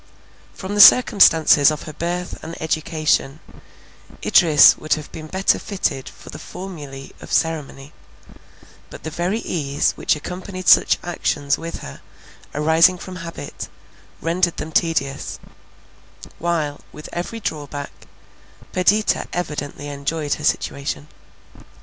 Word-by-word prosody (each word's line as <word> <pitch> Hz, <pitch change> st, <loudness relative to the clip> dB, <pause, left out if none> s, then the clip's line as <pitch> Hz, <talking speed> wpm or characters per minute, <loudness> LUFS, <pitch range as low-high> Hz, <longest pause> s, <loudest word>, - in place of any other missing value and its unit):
From 190 Hz, +1 st, -6 dB
the 205 Hz, -, +5 dB
circumstances 165 Hz, -, +7 dB
of 155 Hz, -1 st, -4 dB
her 155 Hz, -, -8 dB
birth 175 Hz, +3 st, -4 dB
and 165 Hz, -, -8 dB
education, 155 Hz, -2 st, 0 dB, 0.9 s
Idris 155 Hz, -5 st, +7 dB
would 155 Hz, -, -1 dB
have 155 Hz, -1 st, -9 dB
been 155 Hz, -1 st, -8 dB
better 190 Hz, +4 st, +1 dB
fitted 160 Hz, -10 st, -3 dB
for -, -, -13 dB
the -, -, -9 dB
formulae 145 Hz, -8 st, -9 dB
of -, -, -11 dB
ceremony; 150 Hz, -3 st, -2 dB, 1.0 s
but -, -, -12 dB
the 160 Hz, -, -5 dB
very 175 Hz, +7 st, -1 dB
ease 145 Hz, -4 st, -1 dB
which -, -, 0 dB
accompanied 185 Hz, +4 st, -7 dB
such -, -, +6 dB
actions 145 Hz, -4 st, -1 dB
with 165 Hz, 0 st, -6 dB
her, 70 Hz, -, -10 dB, 0.5 s
arising 160 Hz, +4 st, +4 dB
from 180 Hz, +1 st, -9 dB
habit, 165 Hz, -4 st, -8 dB, 0.5 s
rendered 175 Hz, +1 st, 0 dB
them 160 Hz, -, -5 dB
tedious; 145 Hz, -5 st, -1 dB, 1.0 s
while, 155 Hz, -4 st, -2 dB
with 150 Hz, -, -10 dB
every 175 Hz, +7 st, -4 dB
drawback, 145 Hz, -6 st, -5 dB, 0.8 s
Perdita 205 Hz, +4 st, +2 dB
evidently 145 Hz, -4 st, -4 dB
enjoyed 145 Hz, +1 st, -2 dB
her 150 Hz, -, -6 dB
situation. 145 Hz, 0 st, -2 dB
160 Hz, 120 wpm, -21 LUFS, 145-175 Hz, 1.0 s, circumstances